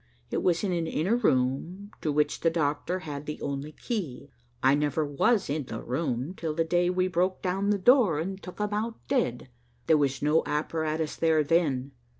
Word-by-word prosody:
It - - 0
was 175 0 +1
in 195 - 0
an 170 -2 -1
inner 180 +8 +1
room 175 - 0
to 155 - 0
which 150 0 +1
the 165 - +3
doctor 165 +3 -1
had 145 -2 -6
the 150 - -4
only 140 +2 -4
key. 155 - -5 0.3
I 135 +1 +6
never 150 +1 +1
was 195 - +2
in 145 0 -2
the 115 - -6
room 130 +2 -2
till 160 -4 -4
the 165 - +2
day 175 +2 +2
we 185 0 +1
broke 185 +1 0
down 195 +2 0
the 205 - +3
door 215 - +5
and 190 +5 -4
took 180 - -9
him 210 0 -2
out 225 +2 -1
dead. 180 - 0 0.4
There 160 - +5
was 140 -2 0
no 150 +2 +4
apparatus 155 +1 -1
there 160 -2 +3
then. 140 -4 +1
160 Hz, 190 wpm, -28 LUFS, 145-185 Hz, 0.4 s, I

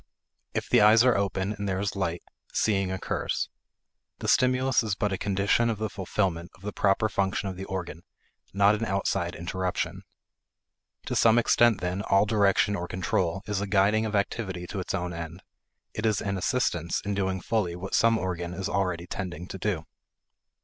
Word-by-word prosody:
If - - -1
the - - +5
eyes 110 +2 +7
are 125 -2 +4
open 100 0 -1
and 100 -1 -4
there 95 0 -1
is 100 0 -2
light, 90 -3 -2 0.3
seeing 95 -3 +1
occurs; 95 - -2 0.7
the - - -5
stimulus 130 0 +3
is 110 -3 -1
but 105 -1 -1
a - - -1
condition 100 +4 +2
of 110 - -1
the 110 0 -3
fulfillment 90 -3 -2
of 95 - -21
the 105 0 -4
proper 100 +2 +2
function 100 -1 -1
of 95 - -6
the 95 +1 -6
organ, 90 -4 -5 0.5
not 100 +1 +4
an 105 +1 -2
outside 95 -4 -1
interruption. 90 +1 -3 1.0
To - - -3
some 115 0 +5
extent, 120 -1 +4
then, 90 +2 -2
all 100 0 +3
direction 105 -1 +3
or 90 -2 -4
control 95 +1 -1
is 105 -2 -2
a 100 - -2
guiding 105 +3 +3
of 105 - -3
activity 95 -3 -2
to 100 - -3
its 95 - -3
own 90 -1 -3
end; 85 +1 -7 0.5
it 110 +1 -1
is 110 - +1
an 100 -1 -2
assistance 90 -4 0
in 100 - -1
doing 95 -1 -1
fully 90 -3 -1
what 95 +2 -7
some 115 0 +4
organ 90 -3 -3
is 95 +1 -3
already 90 -4 -1
tending 90 -2 -5
to 95 - -6
do. 90 -5 -1
95 Hz, 185 wpm, -27 LUFS, 90-105 Hz, 1.0 s, eyes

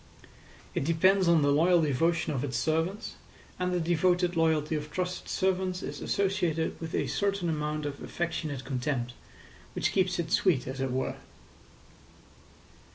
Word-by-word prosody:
It - - -1
depends 185 +5 +3
on 165 -3 +5
the 145 - +3
loyal 170 +3 +4
devotion 155 +3 +1
of 130 - -2
its 130 -4 -2
servants, 165 - -1 0.4
and 180 0 0
the 180 - +1
devoted 175 +1 +2
loyalty 160 -2 +2
of 150 0 -4
trusted 180 +3 -3
servants 185 -1 0
is - - -6
associated 180 -6 0
with 160 -1 -4
a - - +1
certain 200 -3 0
amount 150 -1 -2
of 145 -1 -5
affectionate 160 -5 -3
contempt, 125 -2 -2 0.6
which - - +1
keeps 185 -2 +1
it 165 -1 -3
sweet, 155 -9 +3
as 130 +1 -5
it 135 - 0
were. 130 +1 -2
165 Hz, 150 wpm, -29 LUFS, 150-180 Hz, 0.6 s, on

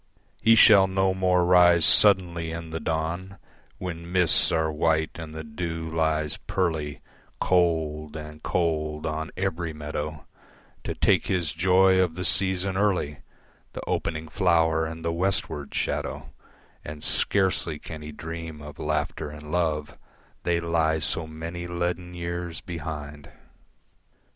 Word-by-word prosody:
He 115 0 +6
shall 105 -4 +7
no 95 0 +1
more 90 -1 +2
rise 85 -2 +6
suddenly 85 -2 +5
in 80 0 -6
the 80 - -3
dawn 80 +5 -3 0.4
When 85 -2 -6
mists 90 -3 +4
are 80 -1 +1
white 80 0 +1
and 80 -2 -8
the 80 - -5
dew 80 +1 -5
lies 80 -2 0
pearly 80 -6 -2 0.4
Cold 80 -4 +1
and 75 0 -8
cold 75 -3 -1
on 80 +1 -3
every 85 -3 -2
meadow, 75 -1 -5 0.6
To - - -3
take - - +2
his 85 -5 0
joy 95 +2 +4
of 85 -3 0
the 90 +1 -2
season 95 +2 +2
early, 95 -8 0 0.5
The - - -6
opening 80 -1 -2
flower 80 -2 +2
and 80 +1 -8
the 85 - 0
westward 85 -5 -2
shadow, - - -3 0.5
And 75 0 -8
scarcely 95 -5 +1
can 75 0 -9
he 75 0 -8
dream 80 0 -7
of 75 0 -11
laughter 75 0 -2
and 75 0 -10
love, 80 -4 -1 0.4
They 85 -1 +1
lie 80 -1 +1
so 80 +1 -2
many 85 +2 -6
leaden 90 0 -3
years 85 -1 -4
behind. 75 -4 -7
80 Hz, 135 wpm, -26 LUFS, 80-90 Hz, 0.6 s, shall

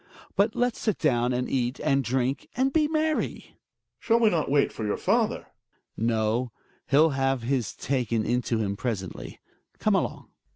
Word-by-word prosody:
But 210 +2 +2
let's 245 -1 0
sit 215 - 0
down 125 -5 +1
and 125 0 -1
eat, 125 0 -1
and 140 -3 +1
drink, 130 +2 -1
and 265 +1 +2
be 310 -2 +3
merry. 310 0 +1
Gregers. - - -14 0.5
Shall 230 0 +2
we 225 -2 +4
not 160 -3 0
wait 140 0 +3
for 110 - -5
your 105 - -1
father? - - +1
Hjalmar. - - -28 0.6
No, 115 +2 0 0.4
he'll 150 +3 +5
have 135 -2 0
his 125 -3 -1
taken 120 -5 -1
into 125 -1 0
him 100 -3 -1
presently. 100 -6 -5 0.4
Come - - +1
along - - -1
130 Hz, 170 wpm, -26 LUFS, 120-165 Hz, 0.6 s, he'll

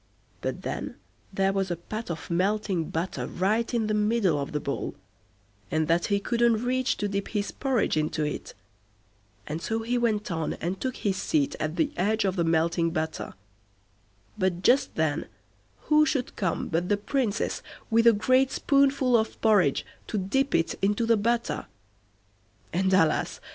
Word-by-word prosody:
But - - -3
then - - -4 0.4
there 195 0 +1
was 195 -1 0
a 175 - -1
pat 215 +6 -6
of 170 0 -5
melting 190 -1 0
butter 170 +3 -3
right 215 +6 0
in 235 -3 +1
the 215 - 0
middle 210 -6 +2
of 140 - -4
the 150 - -1
bowl, 140 -1 -4 0.7
and 155 0 0
that 170 +1 +2
he 200 -1 +2
couldn't 235 +1 +1
reach 255 +1 +1
to 205 - -1
dip 200 0 -2
his 205 -2 -2
porridge 260 - 0
into 155 0 0
it, 150 - -4 0.9
and 155 +2 -4
so 225 +4 -2
he 245 +2 0
went 215 -4 0
on 160 -2 -1
and 180 +4 -4
took 260 -1 -2
his 195 -2 -1
seat 290 +2 0
at 155 +1 -2
the 295 - +1
edge 215 +3 +1
of 190 -1 0
the 170 - +1
melting 165 +1 +2
butter; 160 0 -3 1.0
but 185 -1 0
just 255 +6 +3
then 160 -1 0 0.5
who 305 0 +4
should 275 -5 -1
come 185 -4 -1
but 175 +3 -1
the 205 - +3
Princess, 225 0 -1 0.3
with 230 +1 +4
a - - +10
great 255 +5 +3
spoonful 275 -3 +3
of 220 -1 0
porridge 205 -11 +3 0.2
to 215 - -2
dip 260 +9 0
it 165 - +1
into 205 +4 +1
the 230 0 +4
butter; 235 +3 -1 1.1
and, 190 +2 +1
alas! 165 -4 +2
205 Hz, 170 wpm, -27 LUFS, 170-235 Hz, 1.1 s, a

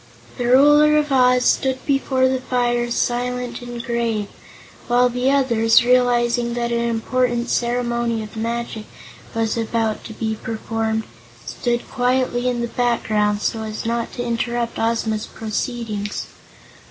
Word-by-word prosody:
The 245 - -1
Ruler 295 +4 +6
of 300 -1 0
Oz 250 -1 +4
stood 260 -1 +1
before 270 -2 +2
the 260 0 -1
fire 240 -1 0
silent 245 +1 -2
and 240 -1 -6
grave, 230 -4 -1 0.6
while 245 +1 +4
the 250 +2 0
others, 235 -5 +4
realizing 240 -1 +2
that 235 0 -1
an 235 - +1
important 240 +1 0
ceremony 235 -1 0
of 215 - -11
magic 230 -1 -3 0.5
was 225 -1 0
about 225 -1 -1
to 220 - -7
be 220 0 -3
performed, 220 0 -2 0.4
stood 240 -1 -2
quietly 250 0 0
in 240 -1 -2
the 235 - -1
background 215 -4 0
so 225 - -1
as 215 0 -5
not 230 0 -1
to 245 - -4
interrupt 235 0 -2
Ozma's 225 -1 -1
proceedings. 215 -2 -4
240 Hz, 135 wpm, -21 LUFS, 225-250 Hz, 0.6 s, Ruler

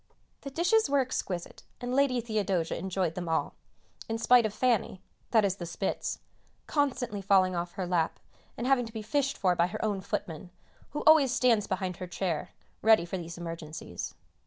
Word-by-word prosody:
The 275 - -6
dishes 355 +7 +2
were 285 - +3
exquisite, 195 -9 -3 0.2
and 245 +1 -3
Lady 270 -2 +3
Theodosia 200 -7 -1
enjoyed 185 -2 -1
them 175 -1 -4
all, 160 - 0 0.6
in 225 - -1
spite 240 0 +5
of - - -7
"Fanny" 230 -4 +1 0.3
(that 220 -3 +4
is 195 -1 0
the 175 - -6
Spitz) 190 +3 -2 0.5
constantly 250 -8 -1
falling 190 -2 +3
off 175 0 -3
her 190 - -3
lap, 175 -2 0 0.4
and 240 - -3
having 255 -3 +3
to 225 - -12
be 220 -2 -5
fished 275 +5 0
for 180 -3 +2
by 170 0 +3
her 215 +3 -3
own 205 -3 -1
footman, 175 -1 -4 0.4
who 295 - -4
always 310 -5 +7
stands 235 -4 +3
behind 185 -2 -2
her 185 - -6
chair, 175 -2 -2 0.3
ready 220 -5 +5
for 185 +2 -4
these 170 0 -7
emergencies. 165 - -6
200 Hz, 180 wpm, -29 LUFS, 175-245 Hz, 0.6 s, always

